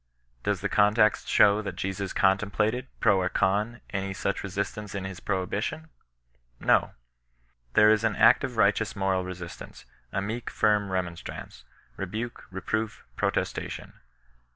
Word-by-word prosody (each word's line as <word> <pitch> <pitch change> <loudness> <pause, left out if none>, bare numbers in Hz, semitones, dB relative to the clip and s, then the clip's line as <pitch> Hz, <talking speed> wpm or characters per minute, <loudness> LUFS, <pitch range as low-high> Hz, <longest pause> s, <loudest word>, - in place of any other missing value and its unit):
Does - - -1
the - - 0
context 105 +1 +3
show 105 0 +5
that 105 - -5
Jesus 95 0 -3
contemplated, 105 +5 +1
pro 95 -2 +4
or 90 - 0
con, 105 +5 0
any 95 0 -3
such 100 - -1
resistance 100 +1 -4
in 95 - -3
his 95 -2 -6
prohibition? 100 - -2 0.7
No. - - +3 0.8
There 105 0 +7
is 110 0 +3
an 110 -3 +1
active 125 -1 +4
righteous 105 +1 +2
moral 95 -2 0
resistance 90 -1 -8
— - - -35
a - - -1
meek 110 +4 -4
firm 105 -2 +2
remonstrance, 90 -2 -5 0.3
rebuke, 110 +6 -5
reproof, 110 +3 -3
protestation. - - -2
100 Hz, 130 wpm, -27 LUFS, 95-110 Hz, 0.8 s, There